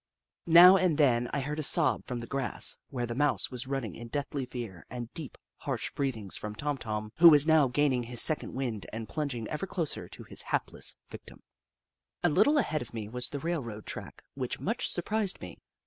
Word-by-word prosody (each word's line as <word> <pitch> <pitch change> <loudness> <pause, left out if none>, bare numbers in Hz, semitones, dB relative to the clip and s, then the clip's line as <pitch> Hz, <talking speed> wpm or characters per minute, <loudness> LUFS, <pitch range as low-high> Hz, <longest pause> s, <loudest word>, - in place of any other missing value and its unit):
Now 175 +3 +9
and 175 -5 +1
then 125 -5 +2
I 140 - -1
heard 150 +3 -4
a - - 0
sob 140 - +1
from 125 -1 -4
the - - -6
grass, 135 0 +1
where 125 -4 -3
the 120 - -5
Mouse 145 +3 0
was 125 +1 -5
rinining 135 -5 -3
in 120 - -9
deathly 140 +1 -4
fear, 115 -9 -7
and 120 -1 -7
deep, 155 -6 -8 0.2
harsh - - -3
breathings 115 -8 -2
from 105 0 -6
Tom 145 +3 -3
Tom, 110 -1 -5
who 170 +1 +9
was 145 -2 +6
now 160 -3 +4
gaining 130 0 +1
his 120 0 +3
second 155 - +5
wind 120 -6 -4
and 110 0 -6
plunging 135 -7 -4
ever 155 +5 -4
closer 170 -5 -3
to - - -10
his - - 0
hapless - - -2 0.2
victim. - - -12 0.8
A 175 - +4
little 210 - +3
ahead 155 - 0 0.3
was 125 0 -2
the 145 - -5
railroad 135 -10 -4
track, - - -8
which - - -4
much - - -1
surprised 205 +2 -1
me. 90 - -10
135 Hz, 195 wpm, -29 LUFS, 120-155 Hz, 0.8 s, Now